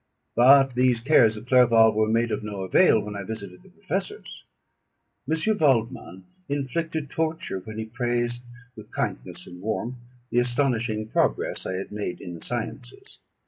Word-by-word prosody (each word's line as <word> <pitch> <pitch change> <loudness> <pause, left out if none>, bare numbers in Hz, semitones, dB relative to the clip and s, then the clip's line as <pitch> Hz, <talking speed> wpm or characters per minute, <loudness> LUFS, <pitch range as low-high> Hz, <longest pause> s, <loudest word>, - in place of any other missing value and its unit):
But 135 +2 +6
these 125 -1 +2
cares 115 -4 +4
of 105 - -9
Clerval 115 -3 +5
were 110 0 +2
made 115 +1 +1
of - - -2
no 105 -2 -5
avail 95 - +4
when 105 0 -7
I 100 - -4
visited 100 -3 -7
the - - -19
professors. 200 - -5 0.9
M. 185 +7 +1
Waldman 115 - 0 0.2
inflicted 145 +2 -3
torture 160 - -2
when 110 +3 -9
he 110 - -3
praised, 120 +1 -2 0.3
with 110 - -12
kindness - - -4
and 90 0 -11
warmth, 110 +4 -3 0.3
the 120 - +3
astonishing 120 -3 0
progress - - 0
I - - -3
had 95 +2 -5
made 105 -4 -4
in 90 - -8
the 85 - -10
sciences. - - -6
120 Hz, 155 wpm, -25 LUFS, 105-135 Hz, 0.9 s, But